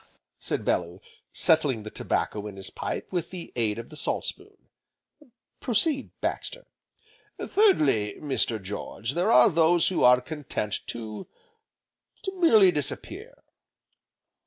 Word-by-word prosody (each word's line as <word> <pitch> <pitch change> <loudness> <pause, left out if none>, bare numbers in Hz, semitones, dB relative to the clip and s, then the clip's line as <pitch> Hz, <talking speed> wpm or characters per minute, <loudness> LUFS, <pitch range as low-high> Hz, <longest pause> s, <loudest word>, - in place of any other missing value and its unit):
said - - -3
Bellew, - - -1 0.3
settling 150 -9 +2
the 110 - -8
tobacco 105 0 -2
in 100 - -8
his 95 - -7
pipe - - -5
with 175 -3 -2
the 180 -2 -9
aid 110 -3 0
of 115 - -8
the 155 - -12
salt - - -1
spoon, - - -6 1.0
"Proceed, 270 +4 +1
Baxter." - - -3 0.7
"Thirdly, 140 - +2
Mr. 130 -6 -1
George, 105 +4 -5
there 180 +9 +1
are - - +7
those 165 +1 +3
who 185 - 0
are 125 0 +7
content 125 -7 -4
to 110 -2 -6 1.0
to 385 - -2
merely 220 - +6
disappear." 150 -5 -5
150 Hz, 125 wpm, -26 LUFS, 110-185 Hz, 1.0 s, are